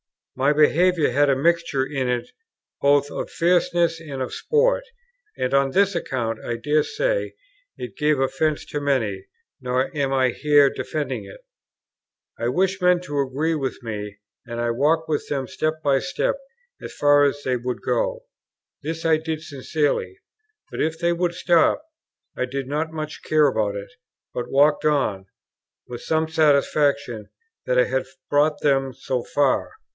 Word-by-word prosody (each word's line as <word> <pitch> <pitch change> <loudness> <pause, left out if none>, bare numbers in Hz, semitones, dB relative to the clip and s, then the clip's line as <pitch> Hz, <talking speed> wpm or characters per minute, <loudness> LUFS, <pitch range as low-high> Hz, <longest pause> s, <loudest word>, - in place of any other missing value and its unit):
My 135 +2 +2
behaviour 160 +1 +3
had 145 +3 +3
a 135 - +4
mixture 165 -2 +1
in 135 -3 -2
it 125 - -2 0.5
both 145 0 +3
of - - -4
fierceness 170 -1 +2
and 145 -5 -7
of 130 - -6
sport; - - +2 0.5
and 130 - -1
on 140 0 +3
this 200 +5 +3
account, 120 -9 -2
I 120 - -3
dare 150 +6 +1
say, - - -1 0.4
it 120 -5 -8
gave 150 0 +2
offence 150 +3 0
to 145 - -4
many; 110 -9 -1 0.3
nor 130 +3 -1
am 140 -2 0
I 130 -1 +3
here 145 +2 +4
defending 135 -8 -4
it. 95 - -12 1.0
I 115 - -1
wished 190 +8 0
men 180 0 +4
to 145 -5 -3
agree 140 +4 0
with 135 -4 -2
me, 105 -2 -5 0.3
and 120 -1 -5
I 120 0 0
walked 155 +7 +1
with 155 -2 -2
them 135 -3 -2
step 155 0 -2
by 140 -2 +3
step, - - -1 0.5
as - - -8
far 145 0 +5
as 145 0 0
they 125 -1 0
would 125 +1 -4
go; - - -1 0.6
this 165 +2 -5
I 160 -1 +4
did 160 0 -4
sincerely; 140 - -2 0.5
but - - -3
if 160 +1 0
they 170 +1 +1
would 175 0 -1
stop, 175 - +3 0.5
I - - -1
did 135 +1 -4
not 155 +3 -2
much 155 -1 -6
care 155 -1 +3
about 110 -7 +1
it, 100 0 -7 0.4
but 120 0 -4
walked 145 +3 +3
on, 120 -11 +1 0.6
with 120 -1 -7
some 160 0 0
satisfaction 140 -6 +1 0.4
that 125 - +1
I 125 - +6
had 130 +1 -1 0.2
brought 150 +1 +2
them 135 -2 +1
so 130 -1 -3
far. 145 -2 +1
145 Hz, 160 wpm, -23 LUFS, 130-160 Hz, 1.0 s, I